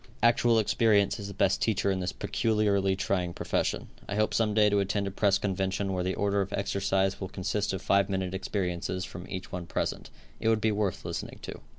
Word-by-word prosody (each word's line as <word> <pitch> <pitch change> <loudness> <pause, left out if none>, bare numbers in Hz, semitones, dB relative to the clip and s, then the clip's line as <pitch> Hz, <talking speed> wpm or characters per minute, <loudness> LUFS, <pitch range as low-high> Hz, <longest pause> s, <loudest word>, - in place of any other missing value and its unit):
Actual 115 0 +4
experience 110 -1 +3
is 100 - -5
the 100 - -7
best - - +2
teacher 100 -3 +1
in 95 - -1
this 90 +1 -2
peculiarly 100 -3 +1
trying 90 -3 -1
profession. - - -1 0.2
I 100 - -2
hope 110 0 +1
some 110 -2 +1
day 105 -1 +5
to 100 -1 +3
attend 100 +1 0
a 100 - -3
press 100 0 +3
convention 95 0 -1
where 90 -1 -1
the 95 +1 -1
order 100 0 +1
of 95 0 -3
exercise 95 -1 0
will 95 - -4
consist 100 +2 -2
of 95 - -4
five 100 0 +3
minute 95 -1 -2
experiences 90 -1 -2
from 90 +1 -9
each 95 0 -6
one 90 -1 -5
present - - -3 0.3
It 110 - +1
would 110 -1 +3
be 110 0 +2
worth 100 -3 -1
listening - - -5
to. - - -7
100 Hz, 210 wpm, -29 LUFS, 95-105 Hz, 0.3 s, day